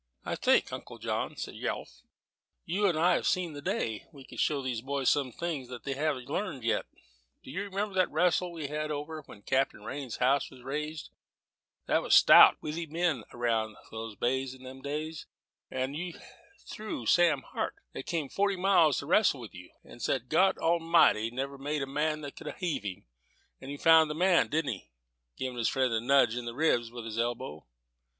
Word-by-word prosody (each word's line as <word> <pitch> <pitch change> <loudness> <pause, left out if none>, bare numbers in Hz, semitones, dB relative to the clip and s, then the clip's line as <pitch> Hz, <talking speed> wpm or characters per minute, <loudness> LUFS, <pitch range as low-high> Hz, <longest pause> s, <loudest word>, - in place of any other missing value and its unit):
"I - - -2
think, - - +2
Uncle - - -7
Jonathan," - - -3
said - - -5
Yelf, - - -5 0.6
"you 200 +5 +1
and 170 -5 +1
I 175 +3 +4
have - - 0
seen 180 -4 0
the 145 - -8
day 110 -5 -2
we 140 -4 -13
could - - -10
show 145 -3 +1
these 125 -3 -2
boys 135 0 +1
some 140 -3 0
things 150 -3 -4
they 125 +2 -5
haven't 140 -3 -2
learned 150 - -3
yet. 115 - 0 0.6
Do - - -10
you 185 +8 -3
remember 200 +1 -3
that 185 -1 +2
wrastle 180 0 +2
we 165 -3 -6
had 155 +1 -3
when 150 -7 -6
Captain 135 +5 0
Rhines's 135 -4 -5
house 135 +3 +2
was 130 -2 -15
raised 150 +3 -4 0.7
there - - +2
was - - +4
stout, - - +9
withy 160 +2 -4
men 160 -6 0
around 115 -3 -1 0.2
these 110 -1 -6
bays 130 +4 -1
in 130 - -16
them 130 +1 -10
days; 150 +2 -5 0.4
how 130 - -1
you 165 +6 -6 0.5
threw 215 - -6
Sam 165 +1 +4
Hart, - - -4 0.2
that - - -7
came 160 -4 -1
forty 200 +7 0
miles 180 -6 +4
to - - -3
wrastle 175 -3 +3
with 115 - -10
you, 90 0 -11
and 120 - -13
said 125 +2 -1
God 185 +6 +4
Almighty 165 -9 +3
never 135 +3 -4
made 145 +1 -2
the - - -1
man 150 +3 -1
that 145 -2 -7
could - - -6
heave 175 - -2
him? 100 -3 -6 0.5
But 135 - -9
he 145 - -5
found 160 0 +6
the 150 - -3
man 180 +1 +4
didn't 155 -4 0
he?" 95 - -12 0.5
giving 125 -2 -4
his 115 - +2
friend 130 -3 +1
a 110 - +1
nudge 135 -2 +4
in 125 -1 -4
the 120 0 -5
ribs 125 -6 +2
with 120 -1 -8
his 115 0 -4
elbow. 120 - -3
140 Hz, 195 wpm, -30 LUFS, 125-165 Hz, 0.7 s, stout